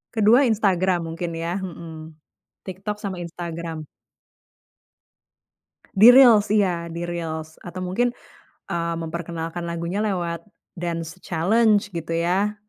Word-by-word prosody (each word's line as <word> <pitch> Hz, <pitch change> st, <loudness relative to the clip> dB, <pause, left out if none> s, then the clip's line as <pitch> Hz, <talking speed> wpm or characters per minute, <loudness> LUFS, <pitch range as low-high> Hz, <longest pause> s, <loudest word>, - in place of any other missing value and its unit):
Ke-2, 220 Hz, +4 st, +5 dB
Instagram 190 Hz, -4 st, +2 dB
mungkin 170 Hz, +1 st, -4 dB
ya. 170 Hz, +4 st, -3 dB
Heeh. 170 Hz, -3 st, -7 dB, 0.7 s
TikTok 195 Hz, +2 st, -5 dB
sama 195 Hz, -4 st, -5 dB
Instagram. 170 Hz, -2 st, -6 dB, 2.1 s
Di 205 Hz, +4 st, +8 dB
Reels, 235 Hz, -5 st, +7 dB
iya 180 Hz, -5 st, +1 dB
di 170 Hz, +1 st, -5 dB
Reels, 160 Hz, -2 st, -5 dB
atau 180 Hz, +1 st, -6 dB
mungkin, 235 Hz, +7 st, 0 dB, 0.6 s
eee, 170 Hz, 0 st, -1 dB
memperkenalkan 165 Hz, +1 st, -5 dB
lagunya 170 Hz, +3 st, -3 dB
lewat 170 Hz, -5 st, -2 dB, 0.3 s
dance 170 Hz, -2 st, -4 dB
challenge 205 Hz, +5 st, +2 dB
gitu 165 Hz, -2 st, -5 dB
ya. 185 Hz, +5 st, +1 dB
175 Hz, 110 wpm, -23 LUFS, 170-200 Hz, 2.1 s, Di